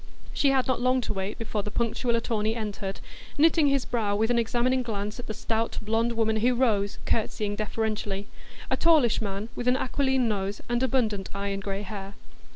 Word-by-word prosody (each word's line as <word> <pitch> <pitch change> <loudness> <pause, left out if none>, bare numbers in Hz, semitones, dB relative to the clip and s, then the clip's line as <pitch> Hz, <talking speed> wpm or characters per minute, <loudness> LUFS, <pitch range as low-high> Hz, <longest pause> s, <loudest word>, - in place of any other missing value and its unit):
She 280 - +3
had 265 -2 +3
not 255 -2 0
long 255 +1 +3
to - - -3
wait 195 +2 -3
before 220 -2 -2
the 210 - -5
punctual 235 +2 0
attorney 225 -1 0
entered, 205 -3 -4 0.4
knitting 315 0 +5
his 275 -2 +2
brow 215 -4 0
with 220 +3 +2
an 240 - +3
examining 240 +3 +1
glance 210 -2 -4
at 245 - -7
the 215 - -3
stout 225 +1 -1
blond 225 +2 0
woman 220 -1 +1
who 245 +3 +3
rose, 210 -5 +1
curtsying 210 -2 0
deferentially,—a 210 -2 -3
tallish 305 -11 +4
man, 200 +1 -3
with 245 - -4
an 250 +1 +4
aquiline 265 -1 +1
nose 200 -2 -2
and 240 0 0
abundant 225 -7 0
iron 200 0 -2
gray 195 0 -3
hair. 195 0 -7
225 Hz, 180 wpm, -27 LUFS, 205-245 Hz, 0.4 s, knitting